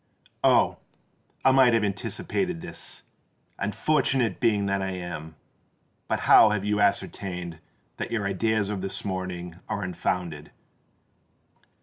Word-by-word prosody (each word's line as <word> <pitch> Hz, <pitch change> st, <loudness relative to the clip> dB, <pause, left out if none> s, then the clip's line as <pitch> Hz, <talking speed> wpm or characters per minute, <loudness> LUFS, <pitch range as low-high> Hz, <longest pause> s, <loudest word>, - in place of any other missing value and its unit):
"Oh! -, -, +4 dB, 0.7 s
I 135 Hz, -, +7 dB
might 130 Hz, -2 st, +6 dB
have 115 Hz, -, +2 dB
anticipated 120 Hz, -, -2 dB
this—unfortunate 130 Hz, -, -2 dB
being 105 Hz, -4 st, +2 dB
that 100 Hz, 0 st, 0 dB
I 95 Hz, -, -1 dB
am! 85 Hz, -3 st, -6 dB, 0.7 s
But -, -, -1 dB
how 110 Hz, -, +7 dB
have 105 Hz, -1 st, -1 dB
you 105 Hz, 0 st, +1 dB
ascertained 90 Hz, -4 st, -1 dB, 0.4 s
that -, -, -4 dB
your 110 Hz, -4 st, -1 dB
ideas 105 Hz, +1 st, 0 dB
of 100 Hz, -3 st, -3 dB
this 95 Hz, +1 st, -4 dB
morning 90 Hz, -3 st, -4 dB
are 100 Hz, -, -2 dB
unfounded? 90 Hz, -3 st, -3 dB
100 Hz, 115 wpm, -26 LUFS, 90-110 Hz, 0.7 s, I